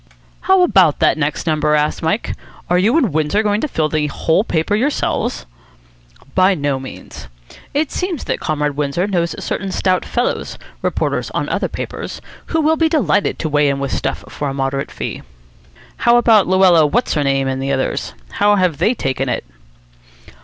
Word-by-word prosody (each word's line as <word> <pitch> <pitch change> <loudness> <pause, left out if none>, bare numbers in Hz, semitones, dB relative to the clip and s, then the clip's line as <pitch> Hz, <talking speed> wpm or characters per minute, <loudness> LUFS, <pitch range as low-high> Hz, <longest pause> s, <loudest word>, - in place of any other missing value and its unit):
"How 380 -1 +4
about 185 - +4
that - - +3
next 150 +1 -2
number?" 155 -2 +2
asked 150 0 0
Mike. 165 +7 -1 0.4
"Are 180 - +4
you 225 - +3
and 240 - +1
Windsor 155 +8 +1
going 210 0 +1
to - - 0
fill 160 - 0
the 155 -1 0
whole 160 +6 +1
paper 160 -3 -1
yourselves?" 260 +8 -1 0.9
"By 185 +1 +4
no 145 -4 -1
means. 130 0 -10 0.5
It 295 +1 0
seems 360 -6 -3
that - - -2
Comrade 150 -2 -1
Windsor 145 +5 -1
knows 175 -4 -1
certain 195 0 -3
stout 185 -1 +1
fellows, 245 +1 -2 0.2
reporters - - -1
on - - -1
other - - 0
papers, - - -6 0.3
who 320 - 0
will 315 +1 +2
be 325 0 +2
delighted 205 - +1
to 160 - -3
weigh 150 -1 +3
in 140 - 0
with 140 -1 -3
stuff - - -3
for 145 - -4
a 135 - -5
moderate 135 0 -2
fee." - - -5 0.8
"How 235 0 +4
about 225 -4 +5
Luella 185 -3 +5
What's 240 +12 0
her 150 - +1
name 135 -1 +1
and 130 0 -2
the 135 +1 -1
others? 130 -1 -2 0.2
How 205 0 +3
have 180 -7 +1
they 235 - +2
taken 135 - -2
it?" - - -2
170 Hz, 180 wpm, -18 LUFS, 145-215 Hz, 0.9 s, about